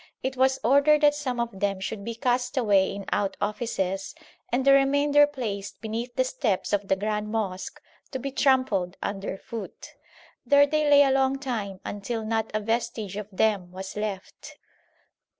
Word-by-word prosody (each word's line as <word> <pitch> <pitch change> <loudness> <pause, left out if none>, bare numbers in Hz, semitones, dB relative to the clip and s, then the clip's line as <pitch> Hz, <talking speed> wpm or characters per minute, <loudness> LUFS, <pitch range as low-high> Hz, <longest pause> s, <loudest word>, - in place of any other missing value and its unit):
It 260 0 -2
was 265 +1 +3
ordered 285 +5 +5
that 295 -1 +5
some 265 -5 -3
of 235 -5 -3
them 200 -1 0
should 200 +1 -5
be 230 +2 -5
cast 250 +1 -1
away 200 -6 +3
in 200 -1 -7
cut 195 -2 -1
offices 195 -3 -2 0.4
and 255 +2 0
the 275 - +7
remainder 285 +2 +4
placed 215 -9 -5
beneath 230 +3 -5
the 260 - +3
steps 225 -7 -1
of 205 -1 0
the 190 - +3
grand 210 +1 -2
mosque 200 -4 -3 0.3
to 265 - -4
be 275 +2 -5
trampled 255 -10 +1
under 195 -1 -4
foot. 220 0 -8 0.5
There 285 0 +6
they 300 +1 +1
lay 285 0 +8
a 270 - +2
long 270 0 +2
time 220 -8 -4
until 220 +2 -4
not 220 0 -1
a 215 - -1
vestige 225 -2 -2
of 210 -1 -5
them 195 -2 0
was 190 +1 -7
left. 210 -3 -6
225 Hz, 170 wpm, -26 LUFS, 200-265 Hz, 0.5 s, lay